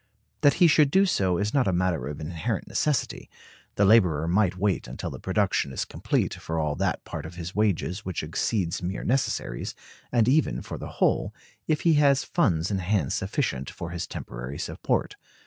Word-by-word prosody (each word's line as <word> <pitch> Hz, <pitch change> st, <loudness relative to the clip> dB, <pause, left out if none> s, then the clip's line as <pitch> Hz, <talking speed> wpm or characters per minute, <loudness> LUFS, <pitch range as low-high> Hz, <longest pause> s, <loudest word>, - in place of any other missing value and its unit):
That 145 Hz, -, +5 dB
he 180 Hz, -, +5 dB
should 150 Hz, -3 st, +5 dB
do 190 Hz, +6 st, +4 dB
so 95 Hz, -, +1 dB
is 105 Hz, +3 st, -1 dB
not 135 Hz, -6 st, +3 dB
a -, -, +3 dB
matter 90 Hz, -3 st, 0 dB
of 75 Hz, -, -6 dB
inherent 85 Hz, +7 st, -3 dB
necessity; 150 Hz, -3 st, -1 dB, 0.5 s
the 100 Hz, -, +3 dB
laborer 90 Hz, -8 st, +4 dB
might 90 Hz, +1 st, +2 dB
wait 100 Hz, -5 st, 0 dB
until 60 Hz, -, -5 dB
the -, -, -8 dB
production 70 Hz, -, 0 dB
is -, -, -2 dB
complete -, -, -1 dB
for 80 Hz, -, -5 dB
all 75 Hz, -2 st, 0 dB
that -, -, -1 dB
part -, -, -6 dB
of 80 Hz, +2 st, -9 dB
his 85 Hz, +1 st, -6 dB
wages 100 Hz, -3 st, 0 dB
which 95 Hz, -4 st, -3 dB
exceeds 85 Hz, +3 st, -1 dB
mere 90 Hz, +2 st, -3 dB
necessaries, 125 Hz, -, -1 dB, 0.4 s
and 120 Hz, -2 st, +3 dB
even 145 Hz, +4 st, +2 dB
for -, -, -7 dB
the -, -, -7 dB
whole, -, -, +1 dB, 0.3 s
if 155 Hz, -1 st, +1 dB
he 165 Hz, -, +4 dB
has 140 Hz, -1 st, +4 dB
funds 90 Hz, -, +1 dB
in 95 Hz, -, 0 dB
hand 90 Hz, -5 st, 0 dB
sufficient 65 Hz, +1 st, -2 dB
for 85 Hz, -, -7 dB
his 85 Hz, -1 st, -4 dB
temporary 65 Hz, +4 st, -7 dB
support. -, -, -2 dB
95 Hz, 185 wpm, -26 LUFS, 80-115 Hz, 0.5 s, That